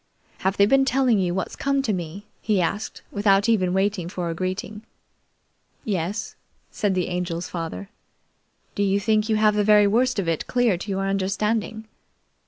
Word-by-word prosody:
"Have 190 +1 -1
they 200 - +6
been 270 +5 +4
telling 260 -5 +2
you 180 -2 0
what's 190 - -3
come 275 -1 0
to 220 - 0
me?" 180 +3 -5 0.2
he 210 -3 +1
asked 195 +5 -2
without 200 0 +3
even 190 -6 +2
waiting 190 -2 0
for 175 -2 -3
a - - -2
greeting. 185 +4 -4 1.0
"Yes," 195 0 -3 0.4
said 205 -4 0
the 180 - 0
Angel's 175 -1 -3
father. 165 - -5 0.9
"Do - - -3
you 200 0 +2
think 215 +1 +1
you 220 - +3
have 215 0 +4
the 210 0 +1
very 210 0 +6
worst 245 +5 +2
of 195 -4 -1
it 165 -2 -1
clear 245 -5 +2
to 185 +4 -7
your 195 0 -1
understanding?" 210 +3 -1
200 Hz, 175 wpm, -23 LUFS, 185-215 Hz, 1.0 s, they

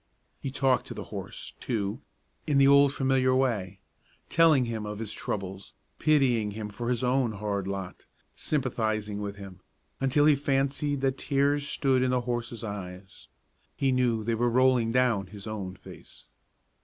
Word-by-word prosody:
He 135 - -3
talked 130 -1 +1
to - - -7
the - - -5
horse, - - -6
too, 110 +1 -2 0.5
in 145 -2 +2
the 135 0 +6
old 140 0 +6
familiar 130 -2 +2
way; 105 -8 -1 0.5
telling 160 -6 +5
him 115 -2 -4
of 105 0 -5
his 110 -1 -5
troubles, 95 -1 -5 0.2
pitying 130 -8 +3
him 105 -1 -4
for 120 +4 -4
his 125 0 0
own 125 -2 +1
hard 100 -2 -3
lot, 95 -2 -6 0.3
sympathizing 110 -7 -1
with 100 -1 -4
him, 100 -2 -10 0.4
until 135 +2 +3
he 155 - +7
fancied 140 0 0
that 135 -1 0
tears 140 +1 +1
stood 130 -2 +1
in 130 - +2
the 125 0 +1
horse's 120 -1 -4
eyes. 95 - -8 0.5
He 135 -1 +1
knew 120 -3 +1
they 115 +2 0
were 120 +2 +1
rolling 125 -1 +3
down 120 -6 +2
his 100 +1 -10
own 100 -4 -5
face. - - -14
120 Hz, 160 wpm, -28 LUFS, 105-135 Hz, 0.5 s, he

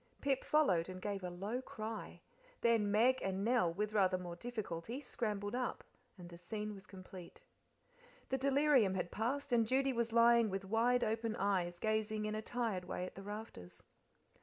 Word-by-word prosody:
Pip 275 -2 0
followed, 190 - +3
and 185 0 -6
gave 200 0 -3
a 180 - -2
low 200 +8 -3
cry; 220 -3 -6 0.4
then 230 -3 +3
Meg 235 +5 +4
and 190 0 -1
Nell, 235 -8 +3
with 210 +4 -2
rather 190 -3 +3
more 175 -1 -6
difficulty, 220 +1 -5
scrambled 210 -6 -3
up, 250 -1 -2 0.3
and 175 -2 -10
the 170 -1 -11
scene 210 +3 -4
was 195 -2 -12
complete. 185 - -11 0.9
The 265 - 0
delirium 270 -7 +4
had 180 -2 -2
passed, 265 +4 -2
and 230 -2 +4
Judy 270 +2 +2
was 235 -1 0
lying 235 -1 +5
with 195 0 -3
wide 235 +4 +2
open 225 0 -1
eyes 185 -4 0
gazing 215 +1 0
in 215 - -2
a 215 - -2
tired 220 -6 -2
way 180 - -3
at - - -8
the 195 - -9
rafters. 205 - -8
215 Hz, 175 wpm, -36 LUFS, 190-235 Hz, 0.9 s, lying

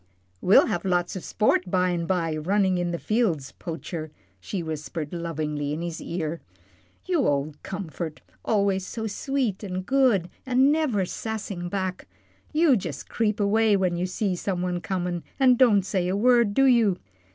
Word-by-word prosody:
"We'll 185 - +6
have 175 - -2
lots 180 -2 0
o' - - -3
sport 190 -1 +1
by 180 0 +2
an' 170 -1 -2
by 170 -4 0
runnin' 190 +4 +1
in 175 -1 -1
the 170 - -2
fields, 175 - 0
Poacher," 165 -1 -6 0.3
she 175 - -4
whispered, 155 0 -5
lovingly, 150 -4 -3
in 160 +3 -4
his 170 -2 -5
ear, 165 -1 -4 0.6
"you 345 -8 +1
ole 145 +1 0
comfort 170 -4 -6 0.2
always 200 -3 +1
so 220 +4 -5
sweet, 225 -1 -2
an' 185 -2 -3
good, 245 -7 +2
an' 260 +1 +4
never 280 -11 +1
sassing 200 -4 -5
back. 185 -1 -3 0.4
You 310 -3 +4
jus' 165 - -4
creep 220 -1 -1
away 210 +1 +3
when 185 -2 +1
you 180 +1 -1
see 185 0 -1
some 180 0 -2
one 180 -1 -2
comin' 180 -2 -2 0.2
and 255 -2 +6
don't 230 -6 +5
say 185 -3 0
a 190 +2 0
word, 235 -2 +4
do 270 - +5
you? 230 -8 +4
185 Hz, 165 wpm, -25 LUFS, 170-220 Hz, 0.6 s, We'll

